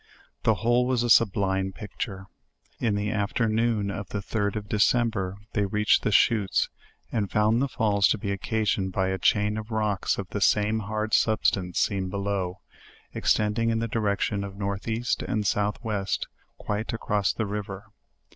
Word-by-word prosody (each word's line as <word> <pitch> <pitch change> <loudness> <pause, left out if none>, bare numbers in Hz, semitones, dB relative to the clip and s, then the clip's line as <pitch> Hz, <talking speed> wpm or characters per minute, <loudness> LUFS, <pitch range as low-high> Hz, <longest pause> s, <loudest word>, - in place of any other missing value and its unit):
The 110 - +3
whole 120 +4 +2
was 125 -2 +1
a 120 - +1
sublime 95 -3 +3
picture. 100 -2 -6 0.5
In 110 -4 +1
the 105 +1 -1
afternoon 110 0 0
of 100 -1 -6
the - - -3
'3d 100 +1 -2
of 105 -1 -4
December, 105 -3 +1 0.2
they 100 -1 +1
reached 105 +2 +3
the - - 0
Chuttes, 105 -1 +3 0.4
and 105 -4 -1
found 110 +3 +2
the 140 - +2
falls 105 -6 +2
to - - +1
be 100 -1 -3
occasioned 100 -1 -1
by 95 +1 +1
n 95 - -2
chain 105 +2 +2
of 110 +1 -8
rocks 105 -3 0
of 100 - -4
the 100 - -4
same 105 +2 +3
hard 110 +1 -3
substance 95 -5 +2
seen 95 -2 0
below, 100 -2 -2 0.5
ex - - +1
tending 110 +2 0
in 115 - +1
the 115 +1 -1
direction 100 -2 0
of 100 -1 -7
north 100 0 -3
east 115 +2 -1
and 110 -4 -2
south 105 +1 +1
west, 105 -3 -1 0.3
quite 105 +3 -3
across 105 -3 0
the 110 - -2
river. 100 0 -5
105 Hz, 170 wpm, -26 LUFS, 100-110 Hz, 0.5 s, The